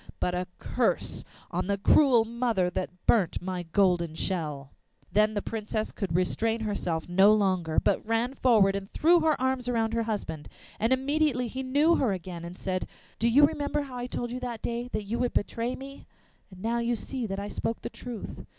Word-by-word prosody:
But 180 Hz, -, 0 dB
a 180 Hz, 0 st, -2 dB
curse -, -, -1 dB, 0.3 s
on -, -, -2 dB
the 200 Hz, 0 st, +1 dB
cruel 240 Hz, +2 st, +5 dB
mother 230 Hz, -6 st, 0 dB
That 180 Hz, 0 st, -5 dB
burnt 200 Hz, -8 st, +3 dB
my 180 Hz, 0 st, -4 dB
golden 175 Hz, -4 st, +2 dB
shell!' 150 Hz, -7 st, -3 dB, 0.4 s
Then 215 Hz, +1 st, +3 dB
the 205 Hz, -, -1 dB
Princess 215 Hz, -1 st, -3 dB
could 185 Hz, -6 st, -3 dB
restrain 225 Hz, +5 st, +1 dB
herself 180 Hz, -6 st, -2 dB
no 190 Hz, +4 st, +6 dB
longer, 185 Hz, -6 st, +1 dB
but -, -, +1 dB
ran 230 Hz, +3 st, 0 dB
forward 220 Hz, -7 st, +4 dB
and 195 Hz, 0 st, -5 dB
threw 340 Hz, +3 st, +4 dB
her 315 Hz, -1 st, +2 dB
arms 260 Hz, -1 st, 0 dB
round 225 Hz, -2 st, 0 dB
her 230 Hz, -, +1 dB
husband. 160 Hz, -8 st, -4 dB, 0.3 s
And 225 Hz, +3 st, +1 dB
immediately 270 Hz, -1 st, +2 dB
he 260 Hz, +3 st, -5 dB
knew 290 Hz, +6 st, +3 dB
her 235 Hz, -7 st, +1 dB
again, 175 Hz, -2 st, -6 dB
and 175 Hz, +2 st, -8 dB
said: 185 Hz, -1 st, -2 dB, 0.3 s
'Do 235 Hz, -, +3 dB
you 285 Hz, +5 st, +7 dB
remember 295 Hz, -1 st, -1 dB
how 265 Hz, -3 st, -9 dB
I 245 Hz, 0 st, -3 dB
told 240 Hz, -1 st, -4 dB
you 250 Hz, -, -4 dB
that 240 Hz, -3 st, -5 dB
day 235 Hz, +1 st, -2 dB
that 215 Hz, -, -2 dB
you 215 Hz, +4 st, -3 dB
would 245 Hz, -1 st, 0 dB
betray 230 Hz, +4 st, -1 dB
me? 275 Hz, +1 st, -10 dB, 0.4 s
Now 220 Hz, +5 st, -2 dB
you 235 Hz, 0 st, 0 dB
see 245 Hz, +1 st, -4 dB
that 195 Hz, -1 st, -4 dB
I 200 Hz, +1 st, -4 dB
spoke 225 Hz, -, -3 dB
the -, -, -4 dB
truth. 240 Hz, -4 st, -7 dB
225 Hz, 195 wpm, -28 LUFS, 190-250 Hz, 0.4 s, you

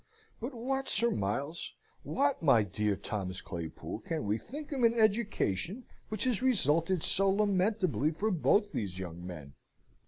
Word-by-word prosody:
But 245 Hz, +4 st, -5 dB
what, 270 Hz, +3 st, -2 dB
Sir 235 Hz, +3 st, +3 dB
Miles, 135 Hz, +12 st, -2 dB, 0.3 s
what, 280 Hz, 0 st, 0 dB
my 135 Hz, -9 st, +5 dB
dear 105 Hz, +1 st, -1 dB
Thomas 95 Hz, -1 st, -4 dB
Claypool, 85 Hz, +3 st, -6 dB
can 160 Hz, +2 st, -3 dB
we 105 Hz, +2 st, 0 dB
think 295 Hz, +4 st, -8 dB
of 275 Hz, -3 st, -2 dB
an 230 Hz, 0 st, +4 dB
education 215 Hz, -, +1 dB, 0.2 s
which 215 Hz, -1 st, -2 dB
has 250 Hz, -4 st, +1 dB
resulted 175 Hz, -, +2 dB
so 195 Hz, 0 st, +4 dB
lamentably 195 Hz, -5 st, +2 dB
for 200 Hz, +8 st, -1 dB
both 205 Hz, +4 st, +2 dB
these 95 Hz, -, -3 dB
young 90 Hz, -2 st, -6 dB
men?" 80 Hz, -6 st, -8 dB
185 Hz, 150 wpm, -31 LUFS, -, 0.3 s, my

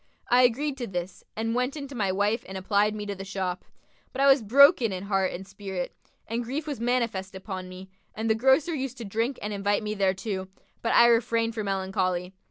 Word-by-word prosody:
I 245 Hz, +1 st, +6 dB
agreed 270 Hz, +4 st, +2 dB
to 240 Hz, -, -3 dB
this 180 Hz, -1 st, -5 dB
and 225 Hz, +1 st, -1 dB
went 250 Hz, +4 st, -1 dB
in 280 Hz, -1 st, -5 dB
to -, -, -9 dB
my 205 Hz, -6 st, 0 dB
wife 205 Hz, +5 st, 0 dB
and 190 Hz, -, -5 dB
applied 205 Hz, +2 st, +1 dB
me 210 Hz, -1 st, -5 dB
to 205 Hz, -, -3 dB
the 195 Hz, 0 st, -7 dB
shop. 190 Hz, -2 st, -3 dB, 0.5 s
But 270 Hz, -, -3 dB
I -, -, +5 dB
was 275 Hz, -1 st, +6 dB
broken 255 Hz, -, +6 dB
in 185 Hz, 0 st, -4 dB
heart 195 Hz, -2 st, +1 dB
and 190 Hz, +2 st, -7 dB
spirit, 195 Hz, -2 st, -5 dB, 0.3 s
and 230 Hz, +2 st, -2 dB
grief 275 Hz, +6 st, -4 dB
was 290 Hz, -5 st, -4 dB
manifest 230 Hz, -6 st, -1 dB
upon 190 Hz, -1 st, -6 dB
me; 185 Hz, +1 st, -10 dB, 0.3 s
and 220 Hz, +1 st, -2 dB
the 220 Hz, -, +4 dB
grocer 265 Hz, +8 st, +3 dB
used 265 Hz, -3 st, -4 dB
to 235 Hz, -, -6 dB
drink 230 Hz, +6 st, -1 dB
and 210 Hz, 0 st, -3 dB
invite 205 Hz, +1 st, 0 dB
me 210 Hz, 0 st, -2 dB
thereto, 190 Hz, -1 st, -1 dB, 0.3 s
but 230 Hz, -, +1 dB
I 235 Hz, -, +8 dB
refrained 230 Hz, -1 st, +2 dB
for 220 Hz, -1 st, -3 dB
melancholy. 190 Hz, -2 st, -1 dB
215 Hz, 215 wpm, -27 LUFS, 190-245 Hz, 0.5 s, I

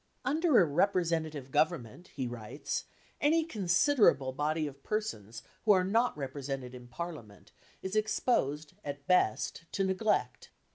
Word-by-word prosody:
"Under 305 Hz, +1 st, +4 dB
a -, -, +7 dB
representative 160 Hz, -4 st, 0 dB
government," 155 Hz, 0 st, 0 dB
he 135 Hz, -3 st, -5 dB
writes, 120 Hz, +3 st, -4 dB, 0.4 s
"any 320 Hz, +3 st, +4 dB
considerable 205 Hz, -, +3 dB
body 155 Hz, +3 st, -1 dB
of 140 Hz, -1 st, -8 dB
persons 115 Hz, -, -4 dB, 0.2 s
who 215 Hz, -, +6 dB
are 185 Hz, -2 st, +3 dB
not 225 Hz, +2 st, +1 dB
represented 135 Hz, -2 st, -5 dB
in 125 Hz, -1 st, -10 dB
Parliament 120 Hz, -, -8 dB, 0.3 s
is 190 Hz, +2 st, -3 dB
exposed, 160 Hz, -, 0 dB
at 140 Hz, -1 st, -6 dB
best, 165 Hz, -2 st, +1 dB
to 195 Hz, -, +1 dB
neglect. 190 Hz, +3 st, 0 dB
160 Hz, 130 wpm, -31 LUFS, 135-205 Hz, 0.4 s, a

